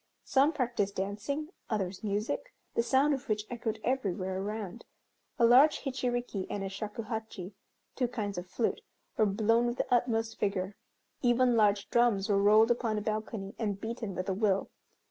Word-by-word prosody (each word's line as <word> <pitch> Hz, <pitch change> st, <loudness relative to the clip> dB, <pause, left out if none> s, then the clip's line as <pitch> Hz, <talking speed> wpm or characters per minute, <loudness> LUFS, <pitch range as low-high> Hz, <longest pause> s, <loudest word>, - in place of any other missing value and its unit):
Some 280 Hz, +3 st, +3 dB
practised 240 Hz, -9 st, -1 dB
dancing, 210 Hz, +11 st, -3 dB, 0.2 s
others 195 Hz, -3 st, -2 dB
music, 215 Hz, -, -2 dB, 0.2 s
the -, -, +2 dB
sound 270 Hz, +5 st, +3 dB
of 275 Hz, -1 st, -5 dB
which 210 Hz, 0 st, 0 dB
echoed 230 Hz, -2 st, -3 dB
everywhere 190 Hz, -7 st, -1 dB
around. 205 Hz, -2 st, -5 dB, 0.5 s
A 235 Hz, -, +5 dB
large 265 Hz, +6 st, +6 dB
hichiriki 245 Hz, -6 st, -2 dB
and 200 Hz, -, -3 dB
a 195 Hz, -, -3 dB
shakuhachi 215 Hz, -1 st, -5 dB, 0.4 s
(two 250 Hz, -, +1 dB
kinds 205 Hz, -6 st, -3 dB
of 175 Hz, -, -8 dB
flute) 225 Hz, +5 st, -1 dB, 0.3 s
were 215 Hz, -, +3 dB
blown 225 Hz, +4 st, +2 dB
with 240 Hz, +1 st, -2 dB
the -, -, 0 dB
utmost 225 Hz, -2 st, +1 dB
vigor. 195 Hz, -1 st, -1 dB, 0.5 s
Even 245 Hz, 0 st, +4 dB
large 210 Hz, -2 st, +3 dB
drums 235 Hz, -5 st, +3 dB
were 200 Hz, -1 st, +3 dB
rolled 215 Hz, +3 st, +6 dB
upon 230 Hz, -2 st, 0 dB
a -, -, -1 dB
balcony 215 Hz, -2 st, -3 dB
and 205 Hz, -4 st, -1 dB
beaten 220 Hz, -3 st, -4 dB
with 185 Hz, -, -3 dB
a 195 Hz, -, +1 dB
will. 195 Hz, -1 st, +1 dB
220 Hz, 165 wpm, -31 LUFS, 200-240 Hz, 0.5 s, large